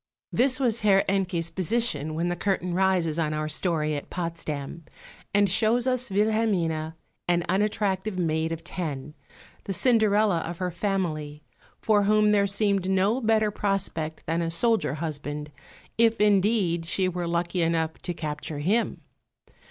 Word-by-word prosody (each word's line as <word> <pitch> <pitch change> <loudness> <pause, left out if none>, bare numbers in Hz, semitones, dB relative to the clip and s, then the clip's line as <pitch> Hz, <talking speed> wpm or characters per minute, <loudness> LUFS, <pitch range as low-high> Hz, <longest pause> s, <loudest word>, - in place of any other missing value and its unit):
This 255 +1 +2
was 235 -4 +1
Herr 195 -2 +4
Encke's 180 -4 0
position 180 -6 0
when 170 +2 -1
the 175 - -1
curtain 180 -1 -1
rises 180 -4 +1
on 155 -2 0
our 155 0 -2
story 155 -1 0
at 145 - -6
Potsdam, 165 -3 -5 0.5
and 205 0 +3
shows 230 +4 +2
us 255 -2 0
Wilhelmine, 195 -7 0 0.3
an 175 -1 +2
unattractive 200 0 0
maid 160 -2 0
of 165 0 -5
ten, 150 -5 -5 0.5
the 195 - -3
Cinderella 215 -4 +3
of 170 +1 -5
her 180 0 -2
family, 165 -6 -3 0.3
for 205 -2 +2
whom 210 0 +4
there 200 -1 +3
seemed 200 -2 0
no 195 +6 +2
better 220 -2 +2
prospect 195 -6 -2
than 165 +2 -1
a 165 - -1
soldier 215 - +1
husband, 150 -1 -5 0.5
if 230 -1 +4
indeed 200 -5 +2
she 185 +2 +1
were 175 -1 -3
lucky 170 +1 -1
enough 165 -1 0
to 175 - -4
capture 150 -1 -5
him. 200 +11 0
180 Hz, 145 wpm, -26 LUFS, 165-210 Hz, 0.5 s, Herr